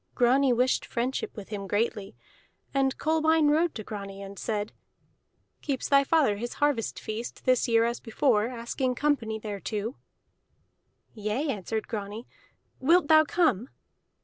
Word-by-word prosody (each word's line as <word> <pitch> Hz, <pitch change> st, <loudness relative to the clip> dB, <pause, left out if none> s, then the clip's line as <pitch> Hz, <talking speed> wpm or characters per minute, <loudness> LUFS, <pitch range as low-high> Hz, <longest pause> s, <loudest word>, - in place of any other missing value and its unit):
Grani 255 Hz, +2 st, +4 dB
wished 250 Hz, +2 st, +2 dB
friendship 245 Hz, 0 st, -3 dB
with 205 Hz, -, -8 dB
him 200 Hz, -2 st, -5 dB
greatly. 205 Hz, 0 st, -1 dB, 0.6 s
And 270 Hz, -1 st, +1 dB
Kolbein 315 Hz, -1 st, +3 dB
rode 325 Hz, +2 st, +2 dB
to 215 Hz, -, -5 dB
Grani 200 Hz, -1 st, -7 dB
and 195 Hz, -1 st, -9 dB
said: 210 Hz, -1 st, -2 dB, 0.9 s
"Keeps 275 Hz, -4 st, -2 dB
thy 275 Hz, 0 st, +6 dB
father 275 Hz, -8 st, +2 dB
his 240 Hz, +3 st, -4 dB
harvest 290 Hz, -7 st, 0 dB
feast 220 Hz, +2 st, -6 dB
this 255 Hz, 0 st, +3 dB
year 230 Hz, -1 st, +4 dB
as 235 Hz, +1 st, -2 dB
before, 225 Hz, -1 st, +1 dB
asking 250 Hz, +1 st, -2 dB
company 240 Hz, -6 st, 0 dB
thereto?" 210 Hz, +3 st, -4 dB, 1.2 s
"Yea," 215 Hz, +7 st, -2 dB
answered 220 Hz, -1 st, -3 dB
Grani. 210 Hz, +1 st, -5 dB, 0.5 s
"Wilt 325 Hz, +4 st, +3 dB
thou 310 Hz, 0 st, +7 dB
come?" 290 Hz, -, +1 dB
240 Hz, 135 wpm, -27 LUFS, 215-280 Hz, 1.2 s, thou